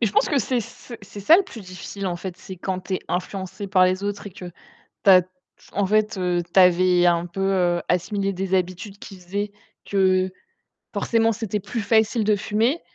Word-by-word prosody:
Mais 230 - +3
je 200 - -3
pense - - +3
que 285 - +2
c'est 245 +1 0
c 235 +2 -10
c'est 200 +1 -10
ça 310 +12 +7
le 390 - +3
plus 235 - -11
difficile 185 +1 -7
en 175 - -2
fait, 180 0 -7
c'est 185 0 -10
quand 185 +1 -3
tu 190 - -4
es - - 0
influencé 190 +2 -4
par 190 -2 +4
les 185 +1 +1
autres 205 0 -4
et - - -6
que, 180 0 -10 0.6
tu - - +6
as 185 -1 +9 0.5
en 200 -1 0
fait, 215 +1 +1
heu, 180 -1 0
tu - - +6
avais, 180 0 +5
heu, - - +6
un 170 0 +2
peu, 175 +2 -6
heu, 180 -3 +2
assimilé 195 +2 0
des 190 0 -3
habitudes 185 +3 -1
qui 195 - -10
faisaient 200 +3 -4 0.3
que 185 -1 +2 0.6
forcément, 225 -1 +2
c'était 215 -2 -3
plus 210 +3 -4
facile 220 +1 +2
de 210 0 +3
fumer. 225 - 0
195 Hz, 215 wpm, -23 LUFS, 185-210 Hz, 0.6 s, as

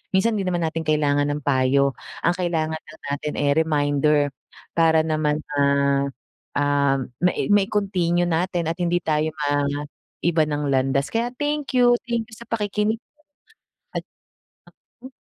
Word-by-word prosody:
minsan 220 +4 +3
hindi 195 -2 -2
naman 175 -2 0
natin 160 0 -2
kailangan 145 -2 +2
ng 145 +1 -3
payo 140 0 +3 0.3
ang 175 - +4
kailangan 160 -3 -1
lang 155 +1 -16
natin 150 +1 -3
eh 145 -1 +2
reminder 150 -1 +2 0.6
para 160 -1 +4
naman, 155 -1 0 0.2
ah, 140 0 +2 0.5
ah, 145 -1 +2 0.3
mai 180 - +2
mai-continue 195 -4 +2
natin 175 0 0
at - - -4
hindi 175 0 +1
tayo 155 0 +1
maiba 145 +3 -1
ng 150 0 -2
landas. 135 +1 +1
Kaya 235 +2 0
thank 295 0 -2
you. 245 -1 +6
Thank 230 -2 -1
you 220 - -10
sa 235 0 -13
pakikinig 210 0 -1 0.9
at - - -3 1.0
naku 260 - -9
160 Hz, 140 wpm, -23 LUFS, 145-185 Hz, 1.0 s, you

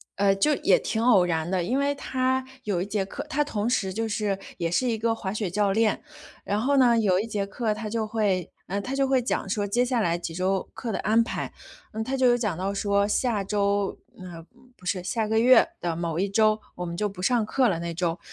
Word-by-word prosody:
呃， 195 0 +3
就 295 +10 +2
也 - - +4
挺 220 - -2
偶 210 -7 +5
然 165 -1 -1
的， 185 -2 0
因 255 +10 0
为 285 0 +1
他 260 -1 -1 0.2
有 195 -7 -1
一 - - -1
节 200 -1 -1
课 280 +8 -7
他 295 0 +1
同 220 -6 -2
时 205 -6 0
就 225 +2 -2
是 205 -2 -1 0.2
也 170 -1 -1
是 250 +9 +1
一 225 - 0
个 225 +1 0
滑 190 -2 -4
雪 210 -4 -2
教 200 +1 +1
练， 220 +4 +1 0.4
然 205 +2 -1
后 280 +3 +2
呢， 240 -3 +5
有 185 -4 +3
一 210 - -1
节 210 -3 -2
课 215 +1 -1
他 215 0 -5
就 225 0 -1
会 205 -5 -1 0.2
嗯， 200 +2 -2
他 260 +6 -5
就 275 -1 +2
会 265 -2 +3
讲 215 -4 -2
说 205 +1 0
接 240 +5 +1
下 250 -1 0
来 170 -3 +1
几 165 -1 -6
周 185 +2 -1
课 235 - -4
的 - - -2
安 225 +3 +3
排， - - -4 0.4
嗯， 220 - -2
他 265 +4 -2
就 260 -1 +3
有 240 0 +4
讲 210 -8 -1
到 190 +3 -2
说 200 0 +1
下 215 -2 0
周 200 0 0 0.2
呃， 170 -3 -9 0.3
不 180 - -17
是 185 0 -1
下 215 +3 -1
个 220 +1 +2
月 255 +6 +6
的 170 -2 -1
某 170 -1 -2
一 195 +1 0
周， 215 +1 +3 0.2
我 180 - -4
们 170 0 -5
就 210 +2 -1
不 185 -2 -9
上 240 +1 +3
课 255 +3 +2
了 170 -5 0
那 170 0 -4
周。 170 -1 -1
210 Hz, 260 characters per minute, -26 LUFS, 190-230 Hz, 0.4 s, 月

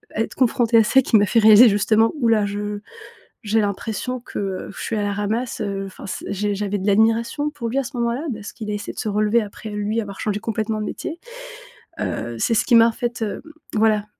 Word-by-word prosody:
être 225 +1 -2
confrontée 240 -2 +3
à 225 - +7
ça 265 +5 +4
qui 235 - +3
m'a 205 - +4
fait 230 - +2
réaliser 220 +2 +8
justement: 215 +2 +2
«Ouh 235 - +3
là, 215 -2 +3
je 205 +1 -4 0.6
j'ai 220 +1 +2
l'impression 220 +5 -3
que, 240 - -10
heu, 195 -2 -4
je - - -7
suis 225 - -2
à 205 - 0
la 205 0 -1
ramasse», 220 +4 -2
heu, 200 -2 -3
enfin 190 - -11
c 185 - -5
j'ai 205 +1 -1
j'avais 205 0 -2
de 190 - -5
l'admiration 225 +7 +2
pour 255 -6 -5
lui 250 - -2
à - - 0
ce 260 - -8
moment-là 235 +5 -1
parce 210 -2 -8
qu'il 215 -2 -7
a - - -2
essayé 205 - -5
de - - -9
se - - -3
relever 210 +3 +2
après 215 +1 -8
lui 210 +2 -2
avoir 200 -2 -8
changé 210 -1 -1
complètement 220 0 -2
de - - -3
métier, 335 +9 -5 0.8
heu, 120 0 -3
c'est 230 - +1
ce 220 - +3
qui 245 - +4
m'a 230 0 +7
en - - -2
fait, 240 -1 -3
hem, 210 - -4 0.3
voilà, 215 -1 +2
215 Hz, 235 wpm, -21 LUFS, 205-230 Hz, 0.8 s, réaliser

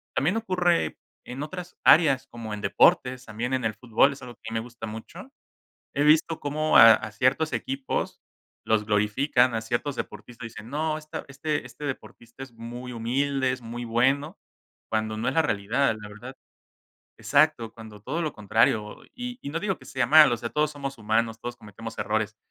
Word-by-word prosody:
también 175 +11 +1
ocurre 180 -5 +1 0.3
en 135 +4 -6
otras 180 +2 -7
áreas 140 -5 +5
como 115 -2 -7
en 105 - -5
deportes, 130 0 +3
también 115 +4 -4
en 130 -2 0
el 110 - 0
fútbol, 120 +5 +2
es 140 - -13
algo 120 -2 -10
que 110 0 -7
me 115 - 0
gusta 115 -2 -8
mucho. 110 - -9 0.7
He 145 - +1
visto 155 +1 +4
cómo 155 +2 +1
a 115 0 +11
a 110 0 -4
ciertos 130 +8 +1
equipos 135 0 -3 0.5
los 110 -1 +2
glorifican, 115 +4 +2
a 110 - 0
ciertos 120 +4 -2
deportistas 115 +3 -7
dicen: 110 0 -10
"No, 155 +1 -1
este 155 0 -7 0.4
este 150 - -11
deportista 130 -2 -7
es 130 - -9
muy 120 +2 -8
humilde, 130 +3 0
es 130 - -5
muy 120 +1 -6
bueno", 130 +6 +1 0.5
cuando 110 0 -1
no 115 +3 -1
es 130 - -1
la 160 - +4
realidad, 110 +1 +1
la 105 - -9
verdad, 120 +6 -10 0.8
exacto, 140 -6 +2
cuando 110 -2 -12
todo 140 +11 -3
lo 155 - -2
contrario 105 0 +1
y 245 0 -6
y 140 - -5
no 165 - -2
digo 195 -2 -1
que 130 - -16
sea 130 -2 -1
malo, 150 -3 +7
o - - -3
sea, 115 +1 -5
todos 150 0 +1
somos 140 -2 -6
humanos, 110 +1 0
todos 120 0 -6
cometemos 110 +1 -10
errores, 110 0 -1
125 Hz, 180 wpm, -26 LUFS, 110-145 Hz, 0.8 s, a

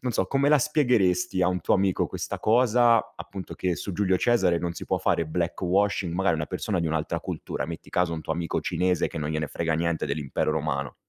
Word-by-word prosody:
non 125 -2 -2
so, 95 - +1
come 135 +7 +2
la 150 -1 +6
spiegheresti 95 - +2
a 90 - +3
un 90 -1 -1
tuo - - +2
amico 95 -1 +1
questa - - -5
cosa, 120 0 +3
appunto 90 +2 -8
che 90 -2 -1
su 100 - -5
Giulio 95 0 +1
Cesare 95 -6 +2
non 85 0 -3
si - - -8
può - - +1
fare 85 - 0
black 85 +2 -2
washing, 95 -1 +1
magari 95 -2 +2
una 75 - -3
persona 90 0 -2
di 85 - -1
un'altra 80 -1 -2
cultura, - - -4
metti 85 0 -8
caso 90 -3 +1
un 80 - -6
tuo 80 - -2
amico 85 -1 -2
cinese, 90 -2 0
che 80 - -6
non 75 0 -3
gliene 75 -1 -1
frega 80 +2 -2
niente 85 -1 -1
dell'Impero 70 -1 -1
Romano. 70 -1 -2
90 Hz, 220 wpm, -26 LUFS, 80-100 Hz, -, la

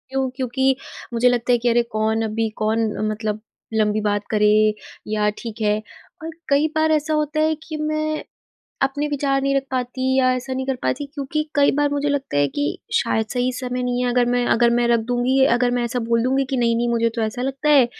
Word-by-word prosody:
हूँ, 265 -1 +1
क्योंकि 265 +1 +1 0.4
मुझे 240 +2 +4
लगता 245 0 0
है 245 - +5
कि 240 +1 0
अरे! 240 0 +3
कौन 220 -1 -1
अभी 220 0 -1
कौन 220 +1 +1 0.2
मतलब 215 0 -3 0.3
लंबी 215 -1 +1
बात 205 -1 0
करे 210 -1 +4 0.6
या 210 0 +1
ठीक 230 -1 -7
है। 210 0 +2 0.4
पर 320 - -5 0.2
कई 285 +2 +3
बार 315 0 +2
ऐसा 310 0 +1
होता 305 0 0
है 315 0 +2
कि 315 -1 -6
मैं 310 0 -2 0.6
अपने 280 +2 0
विचार 275 -1 0
नहीं 275 0 +1
रख 275 - +1
पाती, 260 +1 -1
या 255 -1 +4
ऐसा 255 +1 -5
नहीं 260 0 -3
कर 270 - 0
पाती, 285 +3 -1
क्योंकि 290 +1 -2
कई 285 -1 +4
बार 290 0 +2
मुझे 285 0 0
लगता 280 - -2
है 145 0 +3
कि 290 - -2 0.3
शायद, 220 - +1
सही 250 0 0
समय 250 0 -3
नहीं 250 0 -1
है। 245 - +1
अगर 245 0 +2
मैं 245 0 +1
अगर 235 0 +3
मैं 240 0 +2
रख 235 -1 +3
दूँगी, 250 +2 +2
अगर 245 0 +2
मैं 240 - 0
ऐसा 240 +1 -2
बोल 230 0 +2
दूँगी 265 +2 +2
कि, 265 - 0
"'नहीं, 235 -1 +2
नहीं, 240 +1 0
मुझे 230 -1 +2
तो 230 - 0
ऐसा 220 +3 -2
लगता 270 +3 -2
है।" 275 -4 +6
250 Hz, 220 wpm, -21 LUFS, 230-275 Hz, 0.6 s, है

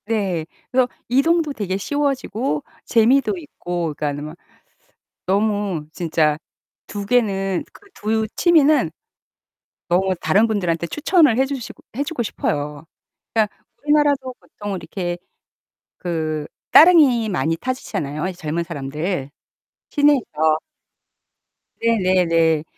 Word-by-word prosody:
네. 195 -7 -1 0.3
그래서 255 -1 +3 0.2
이동도 305 +4 +2
되게 195 -6 -2
쉬워지고 265 - -1 0.2
재미도 260 - +3
있고 175 - -4
그러니까는 145 0 -3
막 155 +3 -9 0.9
너무 200 -4 0
진짜 160 -3 +1 0.5
2 205 -1 -5
개는 195 -6 +1
그 405 - -18
2 220 +1 -1
취미는 305 - +4 1.0
너무 185 +2 +2
다른 210 +4 +4
분들한테 175 -6 -1
추천을 300 - +3
해 265 - +4
주시고 270 -3 -6 0.2
해 285 - +1
주고 300 -3 -4
싶어요. 150 -6 -3 0.5
그러니까 215 -2 +1 0.3
우리나라도 290 -3 +2
보통 205 -2 -7
이렇게 175 -1 -4 0.8
그 155 -3 -2 0.3
따릉이 295 -9 +7
많이 165 -4 0
타시잖아요, 160 - -3
이 - - -3
젊은 170 -1 -3
사람들 150 0 -4 0.6
시내에서. 250 - +3 1.2
네네네. 180 -8 +2
200 Hz, 245 characters per minute, -21 LUFS, 165-260 Hz, 1.2 s, 따릉이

